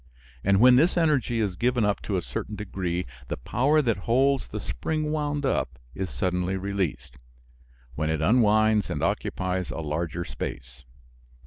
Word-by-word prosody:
And 100 0 +3
when 125 +2 +7
this 165 +6 +3
energy 145 -8 +2
is 100 -4 0
given 120 +1 +1
up 105 0 0
to 100 - -2
a 90 - -2
certain 105 - -5
degree 90 -4 -3 0.2
the - - -3
power 140 - +2
that 115 -5 +1
holds 135 +3 +3
the - - -5
spring 150 - -2
wound 145 -2 -1
up 70 - -1 0.2
is 95 +3 -4
suddenly 90 0 -1
released, 95 -9 -3 0.8
when 75 +5 -2
it 80 -1 0
unwinds 110 +2 +3
and - - -2
occupies 90 0 -1
a - - -5
larger 85 +2 -3
space. - - -7
100 Hz, 155 wpm, -26 LUFS, 90-125 Hz, 0.8 s, when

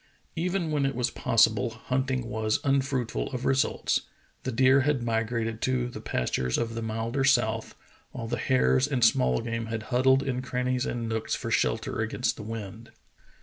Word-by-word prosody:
Even 175 -1 -1
when 145 -2 +1
it 135 0 0
was 125 0 0
possible 115 +1 +3
hunting 130 +2 -2
was 110 -2 0
unfruitful 135 -4 0
of 125 - -4
results; 135 0 +1 0.4
the 130 - -3
deer 130 +3 +5
had 135 -2 +1
migrated 115 -1 -1
to 125 -1 0
the 110 -3 -8
pastures 65 - -1
of 115 -1 -2
the 115 - -4
milder 115 +4 -2
south, 115 -4 +2 0.3
while 115 -2 -6
the - - -2
hares 130 0 +3
and 130 -5 +2
small 65 - +3
game 115 0 -3
had 110 -1 -4
huddled 130 +2 +4
in 130 -2 -2
crannies 125 0 -1
and 120 -1 -3
nooks 110 -1 -1
for - - -5
shelter - - 0
against - - -1
the - - -9
wind. 110 +1 -7
120 Hz, 170 wpm, -27 LUFS, 115-130 Hz, 0.4 s, deer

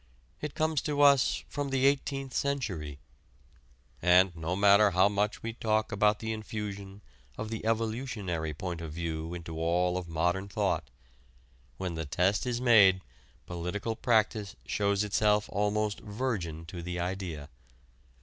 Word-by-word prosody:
It 150 -1 -5
comes 155 -2 +1
to 145 -1 -1
us 140 -2 +4
from 145 -1 -3
the 135 0 +1
Eighteenth 135 -1 0
Century. 95 - -2 1.0
And 90 +1 +5
no 80 +2 -2
matter 100 +1 +6
how 95 +1 +4
much 105 +1 -1
we 115 0 -3
talk 110 -1 0
about 105 0 +3
the 110 0 -3
infusion 105 -2 -6 0.4
of 110 - -4
the 110 - -4
"evolutionary" 110 -7 -2
point 85 +1 -5
of 80 -2 -6
view 80 0 -4
into 80 -2 -7
all 90 +2 +1
of 90 - -9
modern 90 +4 0
thought, 95 - -1 0.9
when 95 -2 -3
the 80 -1 -4
test 95 - +1
is 120 -1 -1
made 105 -7 +6 0.4
political 90 +6 -3
practice 110 -3 +1
shows 100 - +1
itself 105 0 +2
almost 105 +1 0
virgin 100 -8 -3
to 85 +1 -7
the 90 +1 -4
idea. 90 -5 -4
100 Hz, 140 wpm, -30 LUFS, 90-110 Hz, 1.0 s, matter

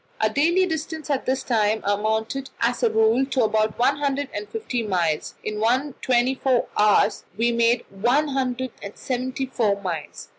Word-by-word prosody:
Our 215 - +2
daily 340 - +3
distance 320 -2 -4
at 270 - -1
this 260 +1 0
time 220 -2 +1
amounted 220 +6 -1
as 240 +2 0
a 235 - +3
rule 220 +3 +3
to 260 -3 +1
about 215 0 +1
one 270 +4 +2
hundred 285 -1 -1
and 205 0 -5
fifty 225 +3 -3
miles; 175 -7 -1
in 210 0 -4
one 255 +6 +1
twenty 250 0 +2
four 260 -2 +1
hours 210 0 +3
we 235 +2 +2
made 235 +1 +2
one 245 +10 +1
hundred 260 -2 -2
and 200 0 -8
seventy 260 +1 -3
four 225 -6 0
miles. 170 -6 -6
240 Hz, 175 wpm, -23 LUFS, 215-265 Hz, -, daily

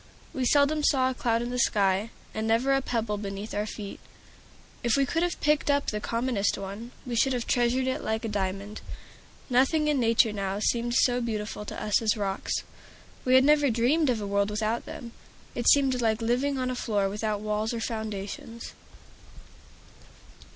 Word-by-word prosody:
We 260 -4 -1
seldom 290 +3 +3
saw 260 -3 +3
a - - -3
cloud 235 -2 0
in 240 - -4
the 250 - -2
sky, 200 -1 +2 0.2
and 220 0 -2
never 235 +5 +3
a 270 - +2
pebble 225 -5 -2
beneath 200 +1 -6
our 210 +1 -1
feet. 205 -2 -7 0.8
If 240 +2 +2
we 275 - +3
could 325 +5 -1
have 350 0 -1
picked 300 0 +2
up 285 0 +2
the 210 - -2
commonest 230 -2 0
one, 200 +4 -7 0.2
we 245 -2 -3
should 265 +3 +3
have 245 -2 -2
treasured 245 +1 +1
it 260 - -2
like 220 +1 -2
a - - -1
diamond. 200 0 -3 0.7
Nothing 270 +5 +3
in 295 -2 +2
nature 230 -2 +3
now 195 -1 -2
seemed 235 +3 0
so 245 -1 +3
beautiful 215 -2 -4
to - - -6
us 210 +1 +1
as 220 -1 +1
rocks. 195 -2 -2 0.6
We 255 0 +4
had 260 - +7
never 290 0 +4
dreamed 255 +7 +2
of 240 -3 +1
a 205 - -4
world 200 0 +1
without 215 +2 -2
them; 235 - -8 0.4
it 240 -1 +2
seemed 265 -3 +4
like 220 -1 +1
living 250 +5 0
on 255 -1 -1
a - - -3
floor 205 -5 0
without 210 +1 -2
walls 215 +1 -1
or 235 - -3
foundations. 220 0 -5
230 Hz, 185 wpm, -27 LUFS, 210-255 Hz, 0.8 s, had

